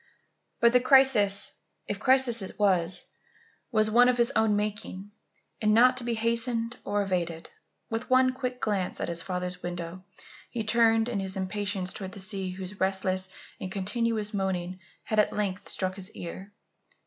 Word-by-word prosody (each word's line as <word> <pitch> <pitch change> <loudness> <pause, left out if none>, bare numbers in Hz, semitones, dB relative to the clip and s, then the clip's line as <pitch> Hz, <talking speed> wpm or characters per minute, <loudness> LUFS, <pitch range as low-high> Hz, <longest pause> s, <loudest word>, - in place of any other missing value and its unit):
But 235 0 +5
the 250 - +7
crisis, 250 -7 +4 0.3
if 205 - -4
crisis 255 -2 +4
it 190 - -7
was, 185 -4 +2 0.7
was 215 -2 +2
one 245 +2 +6
of 250 - +1
his 235 -1 +3
own 220 -1 +3
making 205 -1 -4 0.5
and 215 -1 +3
not 250 +2 +6
to 255 - 0
be 235 -1 -1
hastened 230 +1 0
or 205 0 0
evaded. 170 -4 -3 0.4
With 225 +1 -3
one 255 0 +4
quick 255 -1 -4
glance 200 -6 -1
at - - -2
his 170 -1 0
father's 180 0 -4
window, 175 +1 -6 0.5
he 230 -2 -3
turned 225 0 +3
in 235 -5 -2
his 190 0 -2
impatience 190 -1 -2
towards 190 -1 -7
the - - -7
sea 190 -1 -2
whose 185 +2 -7
restless 190 -1 0 0.3
and 185 - -6
continuous 215 +2 -1
moaning 185 -2 -2 0.2
had 215 - 0
at 210 - +3
length 200 -2 -2
struck 185 0 -2
his 190 -1 -4
ear. 185 +3 -8
205 Hz, 165 wpm, -28 LUFS, 185-230 Hz, 0.7 s, the